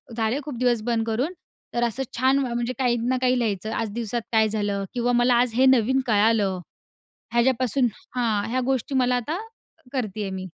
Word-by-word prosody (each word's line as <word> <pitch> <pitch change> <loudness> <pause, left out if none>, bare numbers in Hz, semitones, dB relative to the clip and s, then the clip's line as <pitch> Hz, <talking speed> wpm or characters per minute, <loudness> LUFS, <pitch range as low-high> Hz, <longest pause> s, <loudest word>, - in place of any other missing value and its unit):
झाले 225 +3 0
खूप 285 -4 -6
दिवस 245 -3 +2
बंद 230 -1 0
करून, 250 +10 -1 0.4
तर 240 - 0
असं 235 +4 -3
छान, 260 +3 +3
म्हणजे 240 -2 -2
काही 250 -2 +2
ना 260 - +2
काही 255 0 +3
लिहायचं. 215 -2 -2
आज 225 -1 -2
दिवसात 235 +1 -2
काय 220 -1 +4
झालं 205 -2 -1
किंवा 245 0 0
मला 245 0 +4
आज 245 -2 0
हे 260 +2 +4
नवीन 260 0 +4
कळालं, 210 -3 +2 0.7
ह्याच्यापासून 250 +1 +2 0.3
हां. 220 -4 0
ह्या 255 +2 0
गोष्टी 265 +1 -1
मला 250 -1 +3
आता 295 +8 -2 0.5
करते 215 -6 -3
आहे 195 - -3
मी. 190 0 -5
240 Hz, 180 wpm, -24 LUFS, 220-255 Hz, 0.7 s, काय